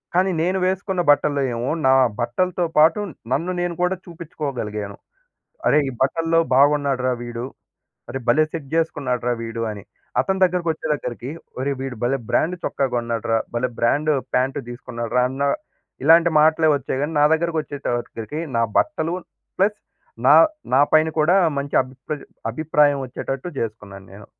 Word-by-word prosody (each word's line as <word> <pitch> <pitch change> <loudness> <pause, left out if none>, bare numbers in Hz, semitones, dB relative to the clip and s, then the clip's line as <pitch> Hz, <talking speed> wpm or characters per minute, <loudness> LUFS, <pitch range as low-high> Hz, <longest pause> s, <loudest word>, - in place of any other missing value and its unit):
కానీ 190 +1 +3
నేను 180 +3 +1
వేసుకున్న 190 0 -1
బట్టల్లో 145 -1 +3
ఏమో, 120 +2 -2 0.2
నా - - +6 0.3
బట్టలతో 175 +10 0
పాటు 160 +6 +5 0.3
నన్ను 165 +7 0
నేను 175 0 -1
కూడా 180 +1 +2
చూపించుకోగలిగాను. 135 - -5 0.7
"అరే! 150 - +5
ఈ - - -2
బట్టల్లో 165 +5 +2
బాగున్నాడురా 140 -2 +3
వీడు, 120 0 -5 0.6
అరే 135 - -4
భలే 155 +6 +5
సెట్ 155 -5 -6
చేసుకున్నాడురా 130 -7 0
వీడు" 115 0 -4
అని. 105 -2 -7 0.4
అతని 190 0 -1
దగ్గరకి 180 -1 0
వచ్చే 160 - -7
దగ్గరికి 125 -2 -5 0.3
"ఒరేయ్ 140 0 -1
వీడు 135 -2 -5
భలే 130 +3 +1
బ్రాండ్ 180 +3 +1
చొక్కా 135 - 0
కొన్నాడురా, 115 -1 0 0.2
భలే 125 +1 0
బ్రాండ్ 145 +6 +2 0.2
ప్యాంట్ 130 +2 +1
తీసుకున్నాడురా!" 120 0 -2
అన్న 135 +1 -4 0.6
ఇలాంటి 165 +3 +6
మాటలే 160 +1 +4
వచ్చాయి. 135 -1 -3
కాని 155 +2 -2
నా 145 - +6
దగ్గరకి 165 0 -1
వచ్చేసరికి 120 -1 -4 0.2
నా 115 - +3 0.2
బట్టలు 170 - 0 0.4
ప్లస్ 205 +2 +2 0.5
నా 145 - +8 0.4
నా 135 - +6
పైన 155 0 +5
కూడా 175 +5 +4 0.2
మంచి 140 0 -4
అభి 130 0 -13 0.6
అభిప్రాయం 145 +1 +2
వచ్చేటట్టు 135 +4 -5
చేసుకున్నాను 105 -4 -6
నేను. 100 +1 -12
140 Hz, 145 wpm, -22 LUFS, 120-165 Hz, 0.7 s, నా